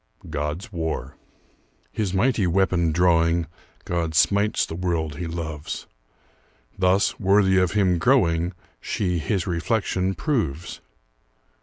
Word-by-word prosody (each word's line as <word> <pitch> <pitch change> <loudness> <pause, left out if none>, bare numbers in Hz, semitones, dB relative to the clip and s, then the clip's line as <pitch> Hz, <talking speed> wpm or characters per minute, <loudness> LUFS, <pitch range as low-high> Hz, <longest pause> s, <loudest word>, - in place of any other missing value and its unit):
GOD'S 75 +6 -4
WAR 80 -2 -3 0.8
His 105 -4 -2
mighty 105 0 +2
weapon 90 -2 +2
drawing, 85 0 +3 0.4
God 85 -2 -2
smites 100 +6 +3
the - - -8
world 80 -4 -2
he 85 +1 -4
loves; 80 -2 -5 0.9
Thus, 95 +1 +2
worthy 95 -1 +4
of 90 0 +1
him 95 -4 +2
growing, 85 -8 +2 0.3
She 90 -4 -1
his 85 +5 -1
reflection 95 +1 -1
proves. 90 - -2
90 Hz, 110 wpm, -24 LUFS, 80-95 Hz, 0.9 s, worthy